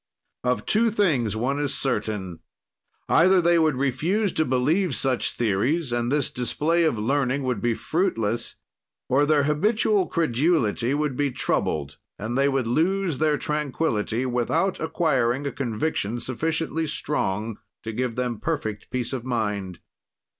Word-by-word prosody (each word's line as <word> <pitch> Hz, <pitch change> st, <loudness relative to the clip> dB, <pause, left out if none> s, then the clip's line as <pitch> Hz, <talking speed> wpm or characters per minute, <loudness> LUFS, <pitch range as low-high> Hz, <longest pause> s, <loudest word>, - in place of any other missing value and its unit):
Of 125 Hz, 0 st, 0 dB
two 230 Hz, +2 st, +3 dB
things 155 Hz, -, +1 dB
one 130 Hz, +6 st, -1 dB
is 145 Hz, -1 st, -1 dB
certain: 105 Hz, -9 st, -2 dB, 0.7 s
either 185 Hz, +3 st, +5 dB
they 170 Hz, -1 st, +4 dB
would 155 Hz, -3 st, +3 dB
refuse 160 Hz, -, 0 dB
to 160 Hz, -, +1 dB
believe 145 Hz, +7 st, +1 dB
such 130 Hz, -2 st, 0 dB
theories 120 Hz, -, 0 dB
and 120 Hz, +1 st, 0 dB
this 145 Hz, -2 st, +1 dB
display 155 Hz, +7 st, +1 dB
of 140 Hz, -8 st, +1 dB
learning 135 Hz, +4 st, 0 dB
would 125 Hz, -6 st, -1 dB
be 120 Hz, -1 st, +1 dB
fruitless, 115 Hz, -, -1 dB, 0.5 s
or 140 Hz, +3 st, +3 dB
their 150 Hz, -2 st, +4 dB
habitual 200 Hz, +6 st, +2 dB
credulity 140 Hz, -, +1 dB
would 150 Hz, -3 st, -1 dB
be 145 Hz, +1 st, +1 dB
troubled 70 Hz, -, -2 dB, 0.2 s
and 110 Hz, +4 st, -4 dB
they 140 Hz, +1 st, +3 dB
would 135 Hz, -3 st, 0 dB
lose 165 Hz, +5 st, +1 dB
their 155 Hz, -1 st, +2 dB
tranquility 140 Hz, -6 st, -1 dB
without 130 Hz, +10 st, 0 dB
acquiring 145 Hz, -5 st, +1 dB
a 140 Hz, -, -1 dB
conviction 120 Hz, -2 st, -2 dB
sufficiently 160 Hz, +5 st, -2 dB
strong 110 Hz, -7 st, -2 dB, 0.2 s
to 110 Hz, -, -4 dB
give 125 Hz, 0 st, -2 dB
them 125 Hz, -3 st, -2 dB
perfect 125 Hz, -10 st, -3 dB
peace 125 Hz, 0 st, -3 dB
of 125 Hz, -3 st, -3 dB
mind. 105 Hz, -7 st, -2 dB
135 Hz, 140 wpm, -24 LUFS, 120-160 Hz, 0.7 s, either